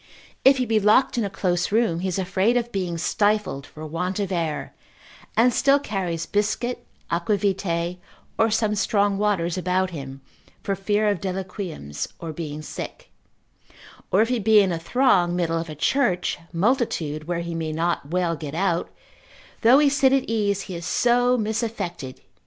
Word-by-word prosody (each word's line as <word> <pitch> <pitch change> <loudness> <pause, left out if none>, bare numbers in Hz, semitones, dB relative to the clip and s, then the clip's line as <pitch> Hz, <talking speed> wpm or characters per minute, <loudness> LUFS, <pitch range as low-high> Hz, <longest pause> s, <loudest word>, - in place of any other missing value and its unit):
If 270 0 +6
he 255 - 0
be 220 -1 +2
locked 210 +6 +4
in - - +1
a 200 - -2
close 180 -2 -1
room, 220 -6 +2
he 190 - -2
is 185 - -2
afraid 195 +5 +1
of 240 0 -2
being 180 -3 -2
stifled 205 -5 0
for 155 +1 -10
want 180 +5 -3
of 200 -2 -2
air, 165 -4 -2 0.6
and 240 +2 +5
still 275 +3 +4
carries 185 - -3
biscuit, 240 +4 -1 0.2
aquavitae, 180 -1 0 0.4
or 225 0 +3
some 215 -1 +1
strong 200 -1 +1
waters 185 -4 0
about 185 +1 0
him, 135 -4 -7 0.4
for 195 - -1
fear 205 +2 0
of 205 -4 0
deliquiums, 185 - -4
or 165 -2 -6
being 155 -1 -6
sick; - - -8 1.0
or 200 +4 +5
if 230 - -3
he 250 -2 +1
be 215 0 +5
in 195 -2 +3
a 165 - -2
throng, 180 -3 +2
middle 165 -2 0
of 165 0 -5
a 155 - -6
church, 180 - +1
multitude, 170 - 0
where 170 0 -2
he 170 0 -5
may 160 -1 -3
not 165 -2 -1
well 175 -1 0
get 150 -1 -7
out, 175 -1 0 0.7
though 240 +4 +7
he 295 0 +5
sit 275 -1 +3
at 270 -1 +3
ease, 205 -3 0
he 195 - -7
is 170 -1 -5
so 245 +1 +3
misaffected. 215 - -3
190 Hz, 170 wpm, -24 LUFS, 170-220 Hz, 1.0 s, though